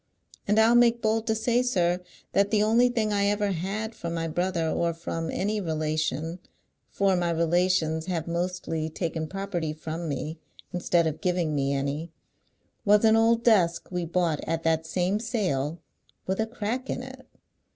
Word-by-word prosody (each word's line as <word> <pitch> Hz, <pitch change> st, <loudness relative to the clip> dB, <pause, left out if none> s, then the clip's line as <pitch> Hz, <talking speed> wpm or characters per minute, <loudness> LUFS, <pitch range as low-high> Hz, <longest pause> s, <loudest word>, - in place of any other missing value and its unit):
And 210 Hz, +1 st, +2 dB
I'll 220 Hz, +2 st, +6 dB
make 240 Hz, -1 st, +5 dB
bold 220 Hz, 0 st, 0 dB
to 220 Hz, -, +2 dB
say, 235 Hz, +2 st, +2 dB
sir, 180 Hz, -8 st, +1 dB, 0.3 s
that 200 Hz, 0 st, +3 dB
the 210 Hz, -1 st, +3 dB
only 235 Hz, +3 st, +4 dB
thing 220 Hz, -3 st, 0 dB
I 200 Hz, 0 st, +2 dB
ever 205 Hz, 0 st, +1 dB
had 200 Hz, +6 st, -3 dB
from 170 Hz, -4 st, -5 dB
my 165 Hz, 0 st, -2 dB
brother, 175 Hz, 0 st, -1 dB
or 170 Hz, +1 st, 0 dB
from 165 Hz, 0 st, -4 dB
any 210 Hz, +2 st, -1 dB
relation, 155 Hz, 0 st, -2 dB, 0.5 s
for 195 Hz, -1 st, +2 dB
my 175 Hz, -1 st, 0 dB
relations 170 Hz, -1 st, +1 dB
have 170 Hz, -3 st, -2 dB
mostly 170 Hz, -2 st, -2 dB
taken 160 Hz, -1 st, -3 dB
property 185 Hz, -4 st, -3 dB
from 160 Hz, +1 st, -5 dB
me 155 Hz, +3 st, -4 dB, 0.3 s
instead 175 Hz, -1 st, +2 dB
of 160 Hz, -1 st, -2 dB
giving 180 Hz, -4 st, 0 dB
me 140 Hz, -1 st, 0 dB
any, 140 Hz, +4 st, -2 dB, 0.7 s
was 210 Hz, +1 st, +5 dB
an 220 Hz, 0 st, +6 dB
old 230 Hz, +1 st, +3 dB
desk 180 Hz, -7 st, +3 dB
we 180 Hz, -1 st, -1 dB
bought 165 Hz, -3 st, 0 dB
at 165 Hz, 0 st, -1 dB
that 160 Hz, 0 st, +1 dB
same 185 Hz, +4 st, 0 dB
sale, 180 Hz, -, -1 dB, 0.5 s
with 190 Hz, +2 st, -2 dB
a 220 Hz, -, +1 dB
crack 240 Hz, +3 st, -3 dB
in 250 Hz, -, -3 dB
it. 260 Hz, 0 st, -11 dB
180 Hz, 170 wpm, -27 LUFS, 160-215 Hz, 0.7 s, I'll